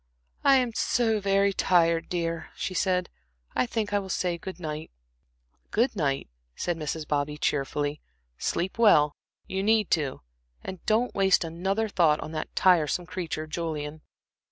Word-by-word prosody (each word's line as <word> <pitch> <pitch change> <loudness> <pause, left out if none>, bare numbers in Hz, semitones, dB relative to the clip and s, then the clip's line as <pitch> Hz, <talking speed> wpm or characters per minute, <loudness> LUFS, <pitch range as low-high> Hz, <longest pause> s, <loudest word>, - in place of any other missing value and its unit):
"I 275 - +6
am 250 -3 +2
so 225 -1 +1
very 200 0 +2
tired, 170 -3 +2
dear," 165 -2 -2
she 185 - -3
said. 180 0 +1 0.5
"I - - +2
think 220 -3 -2
I 205 - +3
will 195 -1 -7
say 180 -2 0
good 185 0 -7
night." 155 -2 -5 0.8
"Good 235 +2 +1
night," 140 - 0 0.3
said 175 - -1
Mrs. 155 -1 -4
Bobby, 150 0 -1
cheerfully. 145 0 -1 0.4
"Sleep 185 +6 -2
well 150 -10 +5 0.3
you 190 0 -2
need 215 0 +2
to 145 -6 0 0.4
and 185 - -7
don't 225 +3 +2
waste 190 -2 +3
another 190 +7 -1
thought 165 -7 +3
on 155 - -6
that 155 -1 -5
tiresome 175 -1 +3
creature, 170 -3 -4
Julian." 155 -1 -4
175 Hz, 150 wpm, -27 LUFS, 155-200 Hz, 0.8 s, I